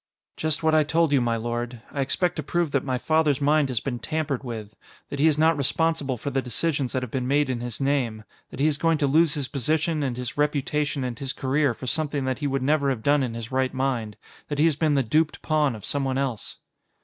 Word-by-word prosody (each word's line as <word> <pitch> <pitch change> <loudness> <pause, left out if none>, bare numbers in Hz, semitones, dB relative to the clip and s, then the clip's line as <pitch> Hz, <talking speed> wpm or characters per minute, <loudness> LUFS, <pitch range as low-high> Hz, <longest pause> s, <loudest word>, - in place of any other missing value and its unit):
"Just 155 0 -1
what 160 0 +3
I 155 -1 +5
told 165 +1 +2
you, 140 -3 +4
my 115 -1 +1
lord. 120 +1 -4
I 140 - -2
expect 170 +6 0
to - - -1
prove 170 +1 -1
that 140 -2 +1
my 130 -2 -1
father's 155 0 +2
mind 145 0 +3
has 125 -3 0
been 120 -2 -4
tampered 155 -1 -2
with 110 -4 -7 0.3
that 140 - -5
he 155 - +5
is 155 -2 +3
not 160 +1 +4
responsible 145 -1 0
for 140 +5 -4
the 135 0 0
decisions 135 +2 -1
that 130 -1 -1
have 125 - -6
been 125 -1 -2
made 140 0 +2
in 120 -2 -3
his 120 -2 -5
name 130 -6 0 0.3
that - - -10
he 140 - +3
is 150 -2 +2
going 165 -1 +2
to 150 - +1
lose 155 +3 +4
his 140 -3 -2
position 155 +4 0
and 130 -4 -2
his 125 +3 -5
reputation 150 -1 0
and 125 -2 -4
his 135 -1 -3
career 135 -1 +1
for 130 - -8
something 145 0 -1
that 130 -1 -1
he 145 - -1
would 135 -1 -1
never 140 0 +2
have 120 -5 -2
done 145 +2 +3
in 120 -3 -2
his 115 +2 -6
right 130 0 0
mind 125 -5 -1 0.3
that 145 - -3
he 150 - +4
has 160 -3 +3
been 150 0 +1
the 135 - +3
duped 155 +7 0
pawn 150 -5 +1
of 105 - -9
someone 135 -2 -1
else." 130 -6 -3
140 Hz, 245 wpm, -25 LUFS, 125-150 Hz, 0.3 s, I